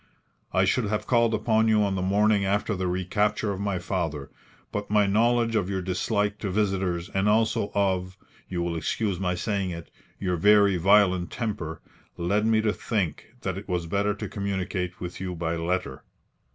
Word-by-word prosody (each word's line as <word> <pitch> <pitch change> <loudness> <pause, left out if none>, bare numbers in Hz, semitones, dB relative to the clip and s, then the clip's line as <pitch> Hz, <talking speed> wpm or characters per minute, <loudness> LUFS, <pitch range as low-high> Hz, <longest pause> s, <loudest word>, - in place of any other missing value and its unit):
I 95 +1 +3
should 110 +5 +1
have 105 +1 -2
called 115 -2 +3
upon 110 0 +2
you 110 -1 +4
on 100 -1 0
the 95 - -1
morning 100 +2 +3
after 100 +2 0
the 95 0 -2
recapture 105 +4 0
of 95 - -4
my 100 -2 -1
father, 85 -6 -3 0.4
but 105 0 -4
my 105 0 +4
knowledge 115 +3 +2
of 100 -4 +1
your 95 -2 -2
dislike 100 +3 -1
to 100 - -3
visitors 95 -3 -1
and 95 +2 +1
also 110 -1 +2
of 95 -2 0 0.3
you 85 -2 -2
will 85 -1 -2
excuse 95 +3 -1
my 90 -1 0
saying 100 0 -1
it 85 -1 -7 0.3
your 90 -2 -1
very 100 +1 +5
violent 95 -1 +4
temper, 95 -9 -4 0.3
led 100 +5 +1
me 110 -1 +3
to 105 -1 +1
think 105 +1 -3
that 95 -3 -3
it 100 - -13
was 90 -2 -1
better 100 +4 0
to - - -5
communicate 95 -2 -3
with 90 0 -6
you 90 -1 -3
by 85 0 -2
letter. 85 -4 -2
100 Hz, 180 wpm, -26 LUFS, 90-105 Hz, 0.4 s, very